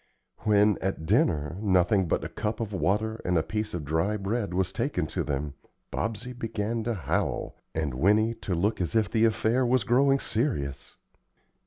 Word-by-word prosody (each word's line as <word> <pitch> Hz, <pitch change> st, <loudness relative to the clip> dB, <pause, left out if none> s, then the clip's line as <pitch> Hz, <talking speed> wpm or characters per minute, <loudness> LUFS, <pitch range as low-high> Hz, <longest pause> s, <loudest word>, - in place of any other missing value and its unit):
When, 105 Hz, -1 st, +3 dB
at 95 Hz, -4 st, -2 dB
dinner, 75 Hz, 0 st, +1 dB
nothing 95 Hz, -1 st, +3 dB
but -, -, 0 dB
a -, -, -2 dB
cup 110 Hz, +1 st, -3 dB
of 110 Hz, -3 st, -3 dB
water 105 Hz, +6 st, 0 dB
and 90 Hz, -1 st, +1 dB
a 80 Hz, -, +2 dB
piece 105 Hz, +2 st, -3 dB
of 80 Hz, -4 st, -4 dB
dry 80 Hz, +8 st, 0 dB
bread 100 Hz, 0 st, -2 dB
was 90 Hz, +1 st, 0 dB
taken 95 Hz, -, -1 dB
to -, -, -2 dB
them, 70 Hz, 0 st, -3 dB, 0.4 s
Bobsey 115 Hz, +3 st, -3 dB
began 115 Hz, -1 st, -3 dB
to 120 Hz, -1 st, 0 dB
howl, 95 Hz, +3 st, -2 dB, 0.2 s
and 80 Hz, -4 st, -1 dB
Winnie 105 Hz, -, +3 dB
to 95 Hz, -5 st, -3 dB
look 100 Hz, +4 st, 0 dB
as 90 Hz, -, -2 dB
if 110 Hz, -3 st, +2 dB
the 115 Hz, 0 st, +3 dB
affair 115 Hz, +3 st, +2 dB
was 125 Hz, -1 st, +2 dB
growing 135 Hz, +5 st, +4 dB
serious. 110 Hz, -, -2 dB
105 Hz, 175 wpm, -27 LUFS, 85-115 Hz, 0.4 s, growing